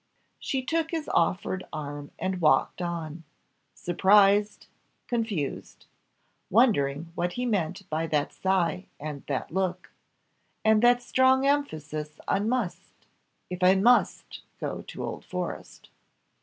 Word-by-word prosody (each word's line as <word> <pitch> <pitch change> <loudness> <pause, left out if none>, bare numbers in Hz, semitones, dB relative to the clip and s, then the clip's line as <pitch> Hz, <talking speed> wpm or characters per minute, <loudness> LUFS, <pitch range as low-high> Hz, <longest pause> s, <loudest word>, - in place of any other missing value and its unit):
She 265 -1 -2
took 320 +4 -1
his 320 -2 -3
offered 185 +2 0
arm 145 -1 -6
and 185 -1 -2
walked 155 +2 +3
on 165 -2 -4 0.5
surprised 200 +3 +3 0.4
confused; 220 - -3 0.6
wondering 165 - +2
what 175 +1 -2
he 250 - -2
meant 190 -4 -2
by 160 0 -2
that 150 -2 0
sigh 185 -2 0
and 145 -1 -6
that 135 -3 -3
look 190 0 -2 0.7
and 220 0 +5
that 245 0 +4
strong 260 +2 +3
emphasis 155 - -2
on 205 +3 +1
must. 240 -8 -4 0.5
"If 180 0 -5
I 185 +1 +6
must 240 +6 +2 0.2
go - - -4
to - - -8
Old - - -6
Forest." - - -6
185 Hz, 120 wpm, -27 LUFS, 155-230 Hz, 0.7 s, I